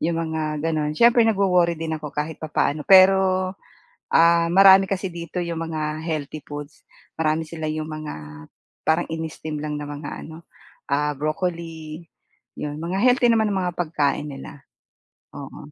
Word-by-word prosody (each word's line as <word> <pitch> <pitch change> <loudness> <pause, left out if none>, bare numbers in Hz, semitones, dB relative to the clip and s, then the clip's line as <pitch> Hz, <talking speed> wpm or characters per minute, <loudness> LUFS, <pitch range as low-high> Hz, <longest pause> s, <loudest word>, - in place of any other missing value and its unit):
'yong 165 0 0
mga 160 -1 -2 0.2
gano'n. 155 -2 0
Siyempre 235 +3 +5
nagwo-worry 180 -5 +2
din 160 0 -3
ako 150 - -6
kahit 150 +2 -4
papaano, 155 -1 -1
pero, 185 -1 +5 0.6
ah, 170 0 +4
marami 195 +1 +7
kasi 190 -2 -3
dito 170 +1 -7
'yong 170 -2 -3
mga 155 -1 -3 0.2
healthy 155 -2 -4
foods, 145 +2 -9 0.3
marami 160 0 0
sila 160 -1 -5
'yong 155 0 -3
mga 155 -1 -6 0.7
parang 160 - +1
ini-steam 160 -2 -5
lang 150 -1 -3
ng 150 - -5
mga 145 0 -7 0.2
ano, 160 +1 -12 0.4
ah, 150 +1 +1
broccoli, 160 +1 -4 0.6
'yon 150 +1 -5
mga 175 +3 -3
healthy 250 -1 +4
naman 220 -2 +3
ang 190 - 0
mga 175 - -8
pagkain 150 -4 0
nila. 140 0 -10 0.7
Oo. 75 - -10
160 Hz, 150 wpm, -23 LUFS, 155-180 Hz, 0.7 s, marami